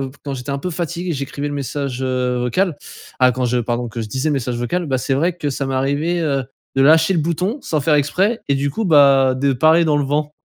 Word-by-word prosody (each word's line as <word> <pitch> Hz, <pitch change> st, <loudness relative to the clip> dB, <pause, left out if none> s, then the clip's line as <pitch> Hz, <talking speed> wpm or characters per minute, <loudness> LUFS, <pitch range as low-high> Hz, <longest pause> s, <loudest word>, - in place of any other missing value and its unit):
heu, 135 Hz, -1 st, -3 dB
quand 140 Hz, -1 st, -4 dB
j'étais 125 Hz, +2 st, -6 dB
un 140 Hz, -, -2 dB
peu 180 Hz, +6 st, -4 dB
fatigué 170 Hz, +1 st, -3 dB
j'écrivais 140 Hz, +1 st, -4 dB
le 145 Hz, -, -4 dB
message, 140 Hz, -2 st, -4 dB
heu, 125 Hz, -1 st, -1 dB
vocal. 145 Hz, +8 st, 0 dB, 0.4 s
Ah 130 Hz, 0 st, +6 dB
quand 125 Hz, +1 st, -2 dB
je, 125 Hz, 0 st, +1 dB
pardon, 120 Hz, +1 st, -2 dB
que 115 Hz, +1 st, -6 dB
je 110 Hz, -, -6 dB
disais 135 Hz, +6 st, -1 dB
le -, -, +1 dB
message 125 Hz, -3 st, -2 dB
vocal. 170 Hz, +9 st, -2 dB
Bah 130 Hz, -2 st, 0 dB
c'est 135 Hz, -, -1 dB
vrai 170 Hz, +5 st, 0 dB
que 150 Hz, -4 st, -3 dB
ça 135 Hz, +1 st, -3 dB
m'est 135 Hz, -, -2 dB
arrivé, 145 Hz, +6 st, 0 dB
heu, 140 Hz, -3 st, 0 dB, 0.3 s
de 135 Hz, -, +4 dB
lâcher 160 Hz, +5 st, +5 dB
le 170 Hz, -, +1 dB
bouton 180 Hz, -, -1 dB
sans 155 Hz, -2 st, -1 dB
faire 150 Hz, +2 st, +2 dB
exprès 190 Hz, +11 st, +1 dB
et 140 Hz, -, +3 dB
du 140 Hz, +1 st, 0 dB
coup 220 Hz, +9 st, -3 dB
bah 140 Hz, -5 st, +5 dB
de 140 Hz, +1 st, +1 dB
parler 160 Hz, +5 st, +4 dB
dans 150 Hz, -1 st, +2 dB
le 145 Hz, -, +1 dB
vent. 150 Hz, +2 st, -1 dB
140 Hz, 260 wpm, -19 LUFS, 130-160 Hz, 0.4 s, Ah